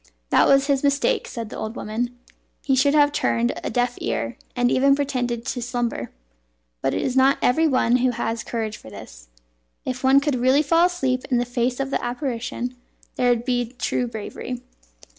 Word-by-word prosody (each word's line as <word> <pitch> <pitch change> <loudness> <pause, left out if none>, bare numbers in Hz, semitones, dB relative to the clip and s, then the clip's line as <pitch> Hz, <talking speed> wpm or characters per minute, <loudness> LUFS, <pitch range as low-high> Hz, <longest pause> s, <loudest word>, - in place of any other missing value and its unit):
"That - - +5
was 275 0 +5
his 280 -2 +1
mistake," 290 - +1
said 230 -3 -6
the - - -6
old 220 +2 -5
woman. 240 +3 -3 0.5
"He 270 - +3
should 280 +3 +3
have 290 -1 +5
turned 240 -4 +1
a - - -2
deaf 245 0 -1
ear, 115 +1 -2 0.2
and 245 -1 +2
even 275 +1 +4
pretended 245 -4 -2
to 260 -2 -3
slumber; 235 - -2 0.7
but - - 0
it - - -1
is 255 - -1
not 265 +1 +5
every 320 +6 +3
one 255 -3 +3
who 255 +1 +2
has 230 -1 -2
courage 220 -2 -3
for - - -13
this. - - -12 0.6
If 255 0 -4
one 265 +1 +6
could 285 +1 -1
really 260 +4 +3
fall 330 +4 +4
asleep 265 -8 -1
in 250 - +2
the 240 - +1
face 245 +1 -1
of 275 0 -2
the - - -1
apparition, 245 -1 -3 0.4
there 250 - +2
would 240 -1 +1
be 245 -2 -1
true 245 -1 -1
bravery." 240 +2 -6
250 Hz, 190 wpm, -23 LUFS, 240-275 Hz, 0.7 s, one